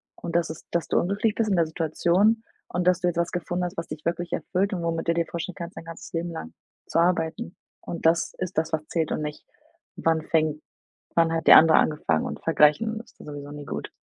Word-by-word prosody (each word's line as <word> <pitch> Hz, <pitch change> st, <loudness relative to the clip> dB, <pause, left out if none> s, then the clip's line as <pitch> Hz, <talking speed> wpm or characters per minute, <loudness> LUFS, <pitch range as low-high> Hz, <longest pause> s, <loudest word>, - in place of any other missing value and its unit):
und 170 Hz, 0 st, -6 dB
dass 170 Hz, -1 st, +2 dB
es 160 Hz, -, -8 dB
dass 170 Hz, -, 0 dB
du -, -, +2 dB
unglücklich 200 Hz, +4 st, 0 dB
bist 220 Hz, -2 st, 0 dB
in 190 Hz, -, +2 dB
der 170 Hz, -, +3 dB
Situation 175 Hz, +7 st, +2 dB, 0.2 s
und 180 Hz, 0 st, -2 dB
dass 180 Hz, -1 st, +4 dB
du 180 Hz, -, +2 dB
jetzt 175 Hz, -1 st, -1 dB
was 170 Hz, 0 st, 0 dB
gefunden 175 Hz, 0 st, -2 dB
hast, 180 Hz, +2 st, -6 dB
was 165 Hz, -, -3 dB
dich 155 Hz, +1 st, -8 dB
wirklich 175 Hz, +1 st, -2 dB
erfüllt 195 Hz, +2 st, 0 dB
und 175 Hz, -2 st, -3 dB
womit 165 Hz, 0 st, -2 dB
du 170 Hz, -, +3 dB
dir 170 Hz, 0 st, 0 dB
vorstellen 170 Hz, +2 st, -5 dB
kannst, 170 Hz, +1 st, -8 dB
dein 165 Hz, -, -8 dB
ganzes 165 Hz, 0 st, -10 dB
Leben 170 Hz, +1 st, -2 dB
lang 80 Hz, -, -7 dB, 0.3 s
zu -, -, +1 dB
arbeiten. 170 Hz, -1 st, 0 dB, 0.3 s
Und 170 Hz, -, -7 dB
das 165 Hz, +1 st, +3 dB
ist 185 Hz, -3 st, -5 dB
das, 160 Hz, 0 st, 0 dB
was 155 Hz, -1 st, -1 dB
zählt 160 Hz, -2 st, -1 dB
und -, -, -2 dB
nicht 150 Hz, 0 st, -6 dB, 0.5 s
wann 160 Hz, -1 st, +1 dB
fängt 155 Hz, -2 st, +1 dB, 0.5 s
wann 165 Hz, -1 st, +3 dB
hat 165 Hz, -, -2 dB
die -, -, +11 dB
andere 160 Hz, 0 st, +8 dB
angefangen 85 Hz, -, +1 dB
und -, -, -5 dB
vergleichen 220 Hz, +10 st, +3 dB
ist -, -, -22 dB
sowieso 145 Hz, -1 st, -8 dB
nie 145 Hz, 0 st, -8 dB
gut. -, -, -5 dB
165 Hz, 230 wpm, -25 LUFS, 160-180 Hz, 0.5 s, die